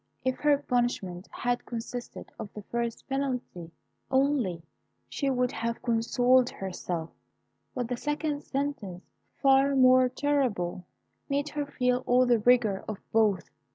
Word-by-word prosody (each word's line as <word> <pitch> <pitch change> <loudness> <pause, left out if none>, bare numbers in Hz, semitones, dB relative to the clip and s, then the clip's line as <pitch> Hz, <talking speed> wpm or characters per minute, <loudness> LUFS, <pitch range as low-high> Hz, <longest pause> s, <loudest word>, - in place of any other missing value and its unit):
If 260 0 +1
her 295 -1 +4
punishment 240 -9 -1
had 245 0 -2
consisted 240 +1 -6
of 215 -3 -6
the 210 - -7
first 235 +1 -3
penalty 255 -11 -3 0.4
only, 260 - +1 0.4
she 280 - -2
would 250 -2 +1
have 230 0 -3
consoled 245 +2 +3
herself; 180 -3 -5 0.6
but 245 -2 -2
the 245 0 -3
second 295 +1 -2
sentence, 265 -10 -3 0.4
far 275 0 +5
more 255 -1 +6
terrible, 240 -12 -1 0.4
made 285 +1 0
her 295 -1 -3
feel 250 -2 +1
all 250 +1 +5
the 240 -2 +3
rigour 220 -4 +3
of 215 - -4
both. 210 -5 +2
245 Hz, 130 wpm, -28 LUFS, 215-270 Hz, 0.6 s, more